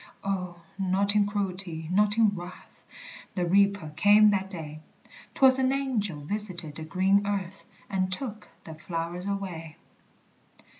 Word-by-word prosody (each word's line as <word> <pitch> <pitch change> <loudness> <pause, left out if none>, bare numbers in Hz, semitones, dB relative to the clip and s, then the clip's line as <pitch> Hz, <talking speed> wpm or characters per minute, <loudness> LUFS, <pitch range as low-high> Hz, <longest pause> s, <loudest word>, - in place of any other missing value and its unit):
O, 180 -3 -3 0.2
not 195 +2 +2
in 205 -1 +4
cruelty, 185 -5 -3
not 210 +3 +2
in 225 -2 +5
wrath, 180 -2 -10 0.5
The 180 -2 0
Reaper 200 -2 +2
came 210 +3 +6
that 195 -1 -1
day; 155 -5 -8 0.6
'Twas 265 -1 +6
an 260 0 +2
angel 230 - -1
visited 175 -2 -4
the 160 - -7
green 190 +5 +2
earth, 195 -1 -4 0.2
And 185 -2 -1
took 215 +1 -5 0.2
the 160 - -9
flowers 170 +3 -5
away. 180 -6 -5
195 Hz, 135 wpm, -27 LUFS, 175-205 Hz, 0.6 s, came